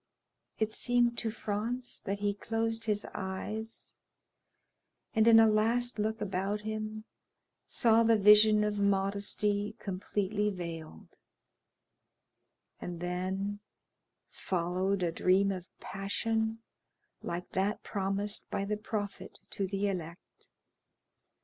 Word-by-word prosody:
It 220 0 0
seemed 240 0 +2
to 225 - -2
Franz 225 +3 -3
that 200 0 -2
he 205 0 +1
closed 225 +2 -2
his 210 -2 0
eyes, 210 +3 -5 1.2
and 220 0 +4
in 225 -1 +9
a 225 - +8
last 225 +2 +2
look 220 +1 -1
about 195 +1 -1
him 215 0 -4 0.6
saw 230 -1 +4
the 230 -1 +5
vision 210 +1 +7
of 210 -1 -1
modesty 200 +1 +1
completely 205 +1 -1
veiled; 165 - -7 1.7
and 175 -1 -6
then 190 +3 -2 0.7
followed 185 +2 -1
a 170 - +1
dream 190 +4 +3
of 185 -2 -6
passion 220 +3 -2 0.6
like 175 +1 -5
that 195 +3 0
promised 200 +1 -2
by 195 - -1
the 210 +1 -1
Prophet 210 -1 -5
to 195 - -1
the 200 +1 -1
elect. 175 -3 -6
205 Hz, 110 wpm, -31 LUFS, 195-220 Hz, 1.7 s, in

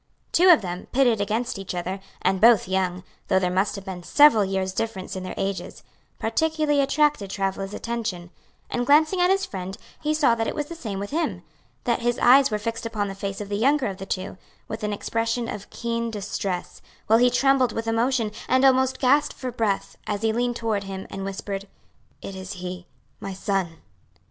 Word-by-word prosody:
Two 365 +2 +5
of 325 - +7
them, 180 0 -5
pitted 245 -5 +3
against 220 +2 -1
each 195 -1 -5
other, 185 +2 -3 0.2
and 190 0 +1
both 230 -4 +6
young, 185 -1 -1 0.2
though - - +3
there 180 -1 +1
must 190 +3 +1
have 200 -1 -8
been 185 -2 -6
several 260 - +6
years' 190 -1 -1
difference 200 -4 -3
in 190 - -4
their 185 - -6
ages, 195 0 -4 0.3
particularly 300 +4 +1
attracted 280 -6 +2
Travilla's 195 0 -2
attention; 220 -7 -4 0.4
and 245 0 -1
glancing 310 +5 +4
at 355 - +4
his 390 0 +2
friend, 190 0 -6 0.2
he 305 0 0
saw 290 -6 +4
that 225 -1 -1
it - - -3
was 295 - -2
the 335 - -8
same 220 -11 -5
with 200 +1 -5
him, 325 +2 -1 0.4
that 240 -1 +1
his 240 0 0
eyes 270 +3 +6
were 215 - 0
fixed 230 +2 -4
upon 210 -3 -2
the - - -5
face 195 0 -5
of 205 - -5
the 205 - -1
younger 275 +4 +3
of 195 -3 -3
the 195 0 -8
two, 185 -1 -4 0.3
with 220 0 -6
an 210 - -1
expression 230 +3 -1
of 210 -2 -6
keen 235 0 -2
distress, 200 -3 -4 0.2
while 225 +1 +5
he 250 +1 +5
trembled 260 -1 +3
with 225 +1 -4
emotion, 225 0 +1 0.2
and 260 +1 +4
almost 260 0 +4
gasped 285 +3 +3
for 255 -1 -5
breath, 220 -4 -1
as 205 0 -2
he 220 -1 +2
leaned 240 +1 0
toward 220 -4 -1
him, 195 0 -6
and 195 - -5
whispered, 195 0 -5 0.6
"It 195 - -6
is 190 +1 -6
he 180 -1 -7 0.3
my 195 - -5
son." 185 -5 -2
220 Hz, 200 wpm, -24 LUFS, 195-250 Hz, 0.6 s, of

